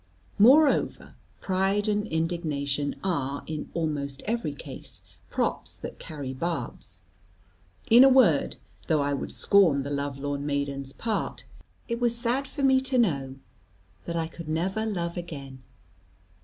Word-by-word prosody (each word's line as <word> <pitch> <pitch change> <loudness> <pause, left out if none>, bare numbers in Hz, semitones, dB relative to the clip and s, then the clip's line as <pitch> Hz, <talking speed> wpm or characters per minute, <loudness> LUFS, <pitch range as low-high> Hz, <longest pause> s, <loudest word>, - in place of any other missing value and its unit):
Moreover, 275 +7 +4 0.3
pride 195 +2 +1
and 210 0 0
indignation 155 -4 -1
are, 140 -7 -1
in 155 -1 -5
almost 145 -4 -2
every 225 -10 -2
case, 135 -7 -9 0.3
props - - -1
that - - -8
carry 140 -4 -6
barbs. 125 - -5 0.9
In 235 +3 +8
a 270 - +8
word, 240 - +4 0.3
though 155 -3 +3
I 145 0 0
would 140 - -4
scorn 170 -9 +4
the 140 - -5
love 140 -1 -2
lorn 140 0 -3
maiden's 140 -1 -2
part, 225 +8 -3 0.4
it 235 0 -3
was 235 -1 +1
sad 250 +3 0
for 280 +1 -5
me 265 -1 +5
to 265 -1 0
know 140 - +1 0.7
that 170 - -4
I 165 -1 0
could 165 -1 -9
never 190 +7 -1
love 175 -4 -3
again. 140 -7 -7
160 Hz, 140 wpm, -27 LUFS, 140-210 Hz, 0.9 s, In